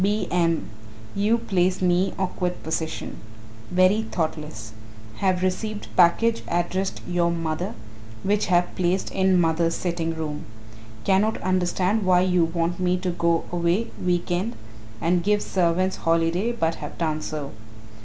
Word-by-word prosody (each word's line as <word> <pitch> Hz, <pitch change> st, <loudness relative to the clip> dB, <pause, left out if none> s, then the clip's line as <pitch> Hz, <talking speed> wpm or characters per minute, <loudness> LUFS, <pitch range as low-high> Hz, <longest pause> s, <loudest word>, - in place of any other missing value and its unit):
B. 210 Hz, +2 st, +1 dB
M. 165 Hz, -2 st, +1 dB, 0.5 s
You 210 Hz, +4 st, +2 dB
place 185 Hz, -5 st, +1 dB
me 180 Hz, +1 st, +2 dB
awkward 180 Hz, -1 st, -2 dB
position. 160 Hz, 0 st, -3 dB, 0.5 s
Very 185 Hz, +4 st, +4 dB
thoughtless. 150 Hz, -, -4 dB, 0.4 s
Have 185 Hz, -2 st, +1 dB
received 210 Hz, +3 st, -3 dB
package 225 Hz, +7 st, +4 dB
addressed 185 Hz, +3 st, -1 dB
your 175 Hz, -1 st, +1 dB
mother 165 Hz, +1 st, -2 dB, 0.5 s
which 205 Hz, +2 st, +1 dB
have 175 Hz, -1 st, +2 dB
placed 185 Hz, +1 st, 0 dB
in 190 Hz, -1 st, +3 dB
mother's 165 Hz, 0 st, +2 dB
sitting 170 Hz, -2 st, -2 dB
room. 155 Hz, -1 st, -4 dB, 0.6 s
Cannot 205 Hz, +3 st, +2 dB
understand 185 Hz, +3 st, +1 dB
why 180 Hz, -1 st, +4 dB
you 180 Hz, -2 st, +3 dB
want 170 Hz, +1 st, -1 dB
me 180 Hz, 0 st, +2 dB
to 180 Hz, 0 st, -2 dB
go 170 Hz, -1 st, +1 dB
away 175 Hz, +6 st, 0 dB
week 175 Hz, -1 st, 0 dB
end 190 Hz, +7 st, -1 dB, 0.4 s
and 175 Hz, +5 st, +2 dB
give 205 Hz, +2 st, +2 dB
servants 185 Hz, +1 st, +1 dB
holiday 165 Hz, +6 st, +1 dB
but 165 Hz, -9 st, 0 dB
have 150 Hz, -, -7 dB
done 155 Hz, -2 st, -1 dB
so. 150 Hz, -3 st, -5 dB
180 Hz, 135 wpm, -24 LUFS, 165-190 Hz, 0.6 s, Very